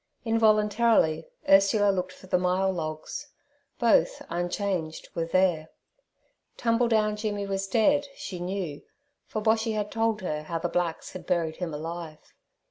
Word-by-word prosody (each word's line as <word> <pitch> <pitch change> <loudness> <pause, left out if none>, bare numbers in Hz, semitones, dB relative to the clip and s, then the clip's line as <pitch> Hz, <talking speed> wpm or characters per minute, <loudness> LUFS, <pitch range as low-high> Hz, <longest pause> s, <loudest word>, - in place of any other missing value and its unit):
Involuntarily 215 -6 +3 0.2
Ursula 200 +1 +5
looked 185 -1 -2
for 190 - -15
the 180 -1 +1
myall 185 +1 +1
logs; 155 - -5 0.5
both, 230 -8 +3
unchanged, 175 -1 -2
were 165 - -1
there. 170 -3 +2 0.9
Tumbledown 230 -3 +2
Jimmy 205 -2 -2
was 195 0 -2
dead, 285 +8 +3
she 185 -3 -6
knew, 175 -4 -4 0.5
for 215 - -4
Boshy 220 +1 +2
had 210 -1 -2
told 225 -2 0
her 150 -4 -2
how 165 +2 -4
the 175 +1 -2
blacks 175 -2 -2
had 185 - -9
buried 165 -3 0
him 175 -3 -3
alive. 160 +1 -7
190 Hz, 135 wpm, -27 LUFS, 170-215 Hz, 0.9 s, Ursula